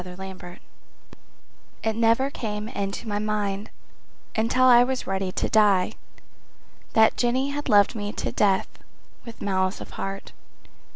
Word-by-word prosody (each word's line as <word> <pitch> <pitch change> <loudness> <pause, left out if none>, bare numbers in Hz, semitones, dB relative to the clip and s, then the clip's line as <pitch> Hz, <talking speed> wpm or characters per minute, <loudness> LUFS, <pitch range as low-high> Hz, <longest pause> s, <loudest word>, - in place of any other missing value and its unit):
Henry 190 +1 -8
Bennett 175 -1 -12 1.2
It 220 -1 0
never 230 +4 +2
came 210 -4 -4
into 200 +1 -4
my 205 -1 -1
mind 210 -1 -2 0.7
Until 230 +3 +2
I 245 -1 +7
was 260 +1 -2
ready 190 -1 -2
to - - -1
die 210 -2 +3 1.0
That 220 0 +4
Jenny 255 +3 +1
had 290 +1 -4
loved 205 -1 +5
me 205 -2 -4
to - - -3
death, 195 -2 +2 0.6
with 230 -1 -9
malice 190 -1 0
of - - -9
heart. 195 0 -6
210 Hz, 135 wpm, -25 LUFS, 195-230 Hz, 1.2 s, I